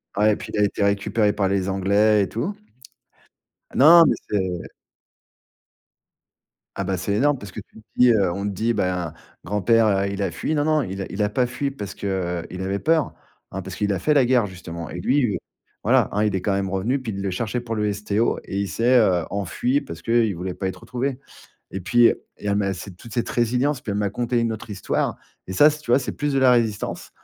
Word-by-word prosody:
Ouais, 105 +1 +3
puis - - -9
il 105 - -1
a - - +4
été 100 0 0
récupéré 100 +1 +1
par 100 -2 0
les 95 -1 0
anglais 100 +2 +3
et - - -4
tout. 155 - -3 1.2
Non, 165 +4 +8
mais - - +3 0.2
c'est 95 -4 -1 2.2
Ah 100 - -2
bah, 95 0 -1
c'est 95 +3 -2
énorme 140 +6 +2
parce 100 -4 -10
que 110 - -7
tu 100 - -20
te - - -33
dis 125 -1 +6 0.2
on 100 - -4
te 100 - -2
dit: 115 +5 0
«Bah, 90 -5 -1 0.3
grand-père, 105 +1 +2
il 100 0 -3
a 100 - -1
fui. 155 - -3
Non, 145 - +1
non, 155 -1 +3
il 95 -2 -5
a - - -3
il 105 +2 -1
a 105 - +1
pas 125 +3 +1
fui 135 +3 -3
parce 100 -7 -7
que, 100 - -5 0.4
heu, - - -11
il 90 - -6
avait 95 +1 -2
peur, 160 -1 +1 0.4
parce 95 -1 -6
qu'il 105 +1 0
a 95 - -2
fait 150 - +2
la 140 -4 +4
guerre 125 -3 +3
justement» 85 -3 -8
et 90 - -6
lui 125 +1 +1 0.5
voilà. - - +3
Hein, 105 +1 +1
il 105 - 0
est 95 - -1
quand 100 - 0
même 95 -1 -1
revenu, 100 +9 0
puis 115 -4 -4
il 100 - -5
le 100 -1 -2
cherchait 115 +5 -2
pour 115 -1 -5
le 105 -1 0
STO 105 +2 0
et 100 - -4
il 100 - -1
s'est 120 +6 +3
heu, 90 -6 +3
enfui 100 +7 0
parce 85 - -9
qu'il 115 -4 +2
voulait 90 +2 -4
pas 95 - -3
être 95 - -6
retrouvé 125 +1 -3 0.6
et 95 - -4
puis 120 +6 +5
heu, - - -2 0.2
il - - -15
y - - 0
amassé 100 -2 -2
toute 110 +5 -13
cette 120 - -1
résilience, 125 +4 0
puis 105 - -6
elle 100 - -1
m'a 105 - +1
conté 120 +3 -1
une 115 -1 +1
autre 110 0 -8
histoire. 95 - -1 0.3
Et - - -4
ça, 150 +11 +6
tu 150 -3 -7
vois, 125 - +6
c'est - - -4
plus 145 0 -2
de 135 - +1
la 130 -1 +5
résistance, 115 -4 -1
105 Hz, 230 wpm, -23 LUFS, 95-120 Hz, 2.2 s, Non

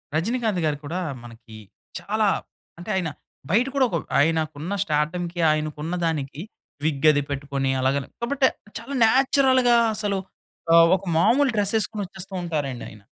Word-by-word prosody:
రజినీకాంత్ 220 +2 0
గారు 150 -2 0
కూడా 170 +5 -3 0.2
మనకి, 115 -1 -13 0.4
చాలా 215 0 0 0.5
అంటే, 175 - -9
ఆయన 180 -4 -1 0.4
బయట 230 +7 +4
కూడా 270 -2 +4
ఒక 175 - -3 0.2
ఆయనకున్న 160 +2 0
స్టార్డమ్‌కి, 170 +3 -2
ఆయనకున్న 155 +2 -2
దానికి, 150 -2 -3 0.4
విగ్ 155 -1 +1
అది 145 -1 0
పెట్టుకొని, 140 -1 -2
అలాగని 135 +1 0
కాబట్టి 265 +2 +2 0.3
చాలా 270 +5 -7
నేచురల్‌గా 260 -1 +4 0.2
అసలు 205 -2 -1 0.5
ఆహ్, 165 0 +7
ఒక 195 - -13
మామూలు 250 - +4
డ్రెస్ 205 0 +1
ఏసుకొని, 215 0 -2
వచ్చేస్తూ 190 +1 -10
ఉంటారండి 145 -7 -3
ఆయన. 105 -1 -15
170 Hz, 135 wpm, -24 LUFS, 150-215 Hz, 0.5 s, ఆహ్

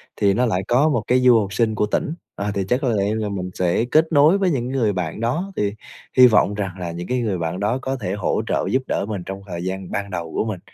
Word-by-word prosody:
thì 100 -1 +2
nó 125 +4 +2
lại 95 -5 0
có 135 +6 +3
một 120 -7 0
cái 125 +1 +3
du 125 -2 +6
học 100 -2 -3
sinh 110 -1 +1
của 105 - +1
tỉnh, 155 +9 -1 0.2
ờ, 100 +1 -2
thì 100 -1 -1
chắc 125 - +2
có 130 - +1
lẽ 105 -1 +1
là 110 -1 -2
mình 90 -2 -4
sẽ 90 +6 +1
kết 160 +6 +2
nối 155 +6 +5
với 190 -2 +1
những 125 -5 -1
người 120 -6 +1
bạn 90 0 -3
đó 155 +12 -1
thì 100 0 -1 0.4
hy 125 0 +10
vọng 105 -3 +3
rằng 100 -2 -3
là 85 -2 -4
những 85 +1 -6
cái 125 0 0
người 100 -5 -1
bạn 85 +2 -3
đó 105 +5 0
có 135 +1 -2
thể 95 -3 -3
hỗ 105 -1 -1
trợ - - 0
giúp 130 - +2
đỡ - - -1
mình 100 -4 -4
trong 95 0 -6
thời 85 -1 -5
gian 95 0 -4
ban 100 0 -3
đầu 85 -3 -5
của - - 0
mình. 105 -5 -4
105 Hz, 280 wpm, -21 LUFS, 95-125 Hz, 0.4 s, hy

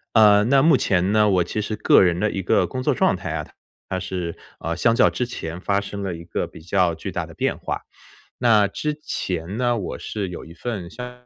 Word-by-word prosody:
呃， 105 -2 +7
那 135 +3 +4
目 155 0 +5
前 95 -2 +1
呢， 105 -1 +4
我 90 -3 +3
其 105 - -3
实 105 +1 -3
个 105 - +5
人 85 -2 +2
的 105 +3 0
一 95 - -3
个 90 - +2
工 130 -1 -4
作 - - +2
状 - - +2
态 - - -5
啊， - - -3 0.4
它 95 - -2
是， 90 -2 -4 0.2
呃， 85 +1 -3
相 115 +6 +3
较 - - +6
之 125 - -2
前 85 -8 -6
发 100 +1 +1
生 100 0 -6
了 95 -3 -3
一 85 - -10
个 85 - -3
比 - - -13
较 90 -1 +1
巨 80 - -6
大 - - -2
的 - - -12
变 - - -1
化。 - - -4 0.6
那 110 -4 +4
之 150 +9 -3
前 90 - -3
呢， 120 -1 +1
我 90 - -5
是 100 -3 -4
有 90 - -8
一 80 - -12
份 95 -1 -5
相 125 +1 -9
100 Hz, 250 characters per minute, -23 LUFS, 90-115 Hz, 0.6 s, 呃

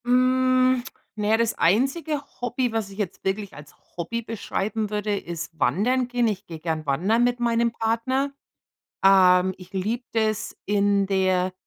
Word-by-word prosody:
Hm. 255 0 +3 0.3
Na 210 -1 -2
ja, 220 +1 +4
das 230 0 +1
einzige 275 - +1 0.2
Hobby, 245 0 -1
was 220 -3 -2
ich 195 - -12
jetzt 205 -5 -4
wirklich 195 +1 -2
als 145 0 -13 0.2
Hobby 230 +8 -3
beschreiben 220 -1 -3
würde, 210 0 -1
ist 170 -3 -6
wandern 240 - +1
gehen. 245 -1 +1
Ich 205 -2 -3
gehe 165 -2 -8
gern 160 -1 -3
wandern 185 +12 +2
mit 245 0 +1
meinem 235 0 +1
Partner. 235 +5 0 0.7
Ähm, 185 -1 +5
ich 185 0 -14
liebe 210 +6 -2
das, 220 -2 -1
in 200 -1 +2
der 185 -1 +1
215 Hz, 155 wpm, -24 LUFS, 190-245 Hz, 0.7 s, Ähm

